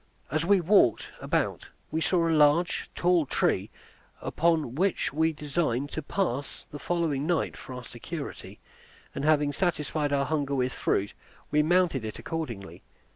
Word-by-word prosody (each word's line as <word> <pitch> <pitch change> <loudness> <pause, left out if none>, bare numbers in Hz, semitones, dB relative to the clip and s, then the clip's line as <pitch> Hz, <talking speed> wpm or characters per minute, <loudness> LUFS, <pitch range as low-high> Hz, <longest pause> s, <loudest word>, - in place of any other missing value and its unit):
As 155 +2 +1
we 195 +3 +4
walked 170 - +4
about - - -1 0.2
we 160 - -1
saw 170 0 +2
a 165 - +2
large, 155 +3 +3
tall 175 -4 +3
tree, - - +1 0.5
upon 160 -6 +1
which 185 0 0
we 160 +2 +2
designed 145 -3 -1
to 155 - -3
pass 145 -4 -2
the 145 - -7
following 160 -5 -1
night 170 -4 0
for 130 - -9
our 125 - -7
security; 140 +6 -7 0.5
and 140 - -4
having 150 -1 +3
satisfied 155 -4 -1
our 140 -1 +2
hunger 140 -1 -1
with 130 -1 0
fruit, 100 +1 0 0.4
we 150 - +4
mounted 165 -5 +2
it 110 -1 -5
accordingly. 120 - -5
150 Hz, 150 wpm, -28 LUFS, 140-170 Hz, 0.5 s, we